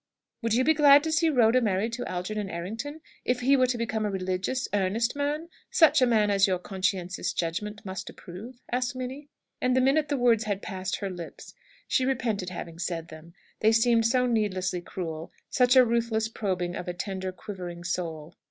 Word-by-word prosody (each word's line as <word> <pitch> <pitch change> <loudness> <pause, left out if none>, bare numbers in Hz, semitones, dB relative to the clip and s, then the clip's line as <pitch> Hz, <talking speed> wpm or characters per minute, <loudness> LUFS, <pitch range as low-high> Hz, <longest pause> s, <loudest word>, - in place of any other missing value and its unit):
"Would 230 -1 +1
you 255 - +3
be 315 - +4
glad 290 -1 +7
to 320 - -1
see 320 +1 +3
Rhoda 250 -3 +4
married 215 +1 0
to 245 - -3
Algernon 195 +3 -3
Errington 225 - -5 0.2
if 250 0 0
he 270 +3 +4
were 255 -1 +4
to 245 -1 -1
become 225 -2 -2
a 210 - 0
religious, 190 +6 -2
earnest 210 +6 +1
man 295 +3 -2 0.2
such 320 -5 +5
a 255 - +5
man 215 -3 +3
as 195 0 +4
your 185 -1 +1
conscientious 185 -1 -2
judgment 210 +6 -3
must 190 -1 -5
approve?" 220 +8 -10
asked 250 +1 -1
Minnie. 260 +3 -6 0.3
And 255 0 +2
the - - +4
minute 280 +4 +3
the 285 - +1
words 235 -3 +3
had 205 -2 -2
passed 190 -2 -3
her 200 - -2
lips 175 -2 -9 0.3
she 260 - +2
repented 230 -8 -1
having 170 -2 -7
said 170 -2 -3
them; 160 +2 -12 0.2
they 220 - +4
seemed 230 0 +4
so 250 +2 +2
needlessly 190 -6 0
cruel; 165 -3 -6 0.2
such 250 0 +4
a 255 -1 +8
ruthless 230 -1 0
probing 185 -5 -2
of 180 - -6
a 175 - -3
tender, 190 0 -4
quivering 180 -3 -7
soul. 170 -3 -4
215 Hz, 190 wpm, -27 LUFS, 185-250 Hz, 0.3 s, a